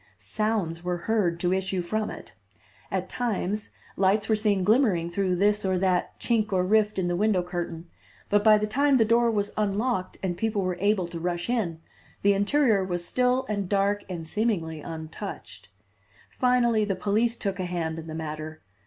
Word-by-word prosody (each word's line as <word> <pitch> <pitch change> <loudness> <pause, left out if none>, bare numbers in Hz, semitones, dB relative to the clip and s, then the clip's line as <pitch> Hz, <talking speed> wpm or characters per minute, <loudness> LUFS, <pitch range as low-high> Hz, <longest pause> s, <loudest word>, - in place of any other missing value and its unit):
Sounds 170 - -2
were 180 0 -1
heard 180 -3 0
to 180 +1 +1
issue 190 -1 -1
from 215 +5 -2
it. - - -10 0.6
At - - -2
times 210 -3 -2 0.3
lights 200 +2 +2
were 220 - +3
seen 210 -3 +1
glimmering 200 -6 +2
through 185 0 0
this 205 +3 +2
or 190 -1 +1
that 185 -1 0
chink 220 -3 0
or 185 -1 +2
rift 210 +1 +2
in 185 -2 0
the 175 - 0
window 200 -1 +2
curtain, 175 -1 -5 0.4
but 205 0 +2
by 215 -1 +7
the 210 - 0
time 275 +5 +3
the 225 - +4
door 235 +1 +3
was 205 -2 -1
unlocked 210 -1 -1
and 180 -2 -1
people 210 +1 -1
were 180 -1 -2
able 200 -3 +1
to 170 -1 -6
rush 175 +5 -2
in, 175 -10 -1 0.4
the 200 0 +5
interior 210 +1 +2
was 175 -2 -3
still 250 +3 +1
and 200 -3 -2
dark 200 0 +1
and 170 -3 -5
seemingly 165 -7 -1
untouched. 160 - -8 0.6
Finally 240 -3 +2
the 200 -2 -1
police 220 +5 +1
took 195 -1 -3
a 185 - -1
hand 165 -2 -3
in 160 - -9
the 160 - -6
matter. 155 0 -6
195 Hz, 180 wpm, -26 LUFS, 175-215 Hz, 0.6 s, by